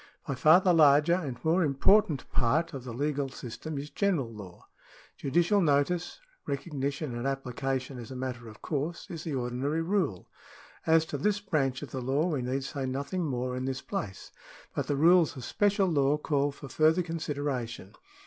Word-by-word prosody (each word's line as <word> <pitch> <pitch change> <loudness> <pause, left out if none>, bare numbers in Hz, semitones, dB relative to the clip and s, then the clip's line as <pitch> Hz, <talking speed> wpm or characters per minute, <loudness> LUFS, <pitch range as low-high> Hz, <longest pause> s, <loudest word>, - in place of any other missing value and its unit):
By 140 - -1
far 155 +6 +6
the 185 -2 +3
larger 150 +1 +6
and 150 -9 -2
more 170 +3 +3
important 150 +2 +3
part 150 +8 +1
of 130 -2 -7
the 125 - -5
legal 140 +2 -1
system 135 +5 -7
is 145 +2 -6
general 165 - 0
law. 95 -5 -11 0.5
Judicial 175 +8 +2
notice 165 - +1
— - - -35
recognition 140 -1 -3
and 120 +3 -2
application 135 0 -3
as 115 - -8
a 130 - -7
matter 125 -2 -5
of 110 -1 -13
course 155 +3 -3
— - - -32
is 165 -2 -6
the 155 -4 -2
ordinary 130 +6 -1
rule. 165 - -1 0.6
As 160 0 +5
to 145 -3 -5
this 205 +6 +1
branch 145 -9 -1
of 135 - -8
the 130 - -4
law 135 +5 +1
we 155 -7 -1
need 130 +2 -2
say 135 -1 -4
nothing 140 +7 -2
more 125 -1 -2
in 130 0 -3
this 130 -1 -3
place, 95 -3 -5 0.4
but - - -2
the 145 - 0
rules 165 +1 +5
of 130 - -7
special 200 - +2
law 145 -3 +2
call 145 -1 0
for 140 0 -10
further 160 +5 +3
considera 145 -6 -2
tion. 100 -4 -10
140 Hz, 185 wpm, -29 LUFS, 130-165 Hz, 0.6 s, far